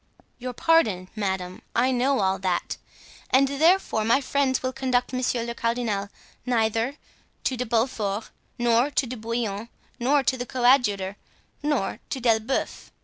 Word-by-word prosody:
"Your 250 Hz, 0 st, -5 dB
pardon, 220 Hz, -, +2 dB
madame, 190 Hz, -3 st, -3 dB
I 255 Hz, +2 st, +3 dB
know 260 Hz, 0 st, +2 dB
all 190 Hz, 0 st, +1 dB
that. 185 Hz, -2 st, -1 dB, 0.5 s
And 270 Hz, +1 st, +4 dB
therefore 300 Hz, -, +2 dB
my 230 Hz, +5 st, +4 dB
friends 270 Hz, -1 st, 0 dB
will 255 Hz, 0 st, -1 dB
conduct 255 Hz, -1 st, 0 dB
monsieur 255 Hz, -2 st, 0 dB
le 235 Hz, 0 st, -4 dB
cardinal 230 Hz, -4 st, -1 dB, 0.3 s
neither 230 Hz, +1 st, +1 dB, 0.5 s
to 260 Hz, -, 0 dB
De 250 Hz, 0 st, -3 dB
Beaufort, 225 Hz, -3 st, -1 dB, 0.3 s
nor 240 Hz, +2 st, +3 dB
to 285 Hz, -, +1 dB
De 255 Hz, +1 st, -5 dB
Bouillon, 225 Hz, -1 st, -3 dB, 0.3 s
nor 275 Hz, +4 st, +3 dB
to 260 Hz, 0 st, 0 dB
the 245 Hz, -, -4 dB
coadjutor, 235 Hz, -7 st, +2 dB, 0.4 s
nor 295 Hz, -8 st, -1 dB
to 270 Hz, -, -3 dB
D'Elbeuf. 230 Hz, +1 st, 0 dB
240 Hz, 145 wpm, -25 LUFS, 215-260 Hz, 0.5 s, And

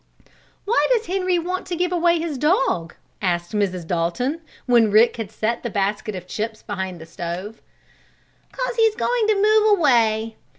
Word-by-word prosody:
"Why 445 Hz, +4 st, +2 dB
does 465 Hz, -2 st, +2 dB
Henry 370 Hz, -2 st, 0 dB
want 365 Hz, +2 st, -3 dB
to 360 Hz, -, -3 dB
give 360 Hz, +1 st, -1 dB
away 345 Hz, -1 st, +3 dB
his 320 Hz, -5 st, -4 dB
dog?" 270 Hz, -, +1 dB, 0.3 s
asked 175 Hz, -3 st, -1 dB
Mrs. 185 Hz, -5 st, -1 dB
Dalton, 175 Hz, -, -1 dB, 0.2 s
when 235 Hz, -3 st, +4 dB
Rick 220 Hz, +4 st, +4 dB
had 225 Hz, -4 st, -5 dB
set 220 Hz, +2 st, -2 dB
the 240 Hz, -, -4 dB
basket 205 Hz, +1 st, -2 dB
of 180 Hz, -1 st, -7 dB
chips 220 Hz, +3 st, -5 dB
behind 190 Hz, -3 st, -5 dB
the 160 Hz, -, -10 dB
stove. 175 Hz, +6 st, -6 dB, 0.9 s
"'Cause -, -, -3 dB
he's 445 Hz, -1 st, +3 dB
going 475 Hz, -1 st, 0 dB
to 430 Hz, -, +3 dB
move 430 Hz, 0 st, +4 dB
away. 225 Hz, -, +2 dB
235 Hz, 165 wpm, -22 LUFS, -, 0.9 s, when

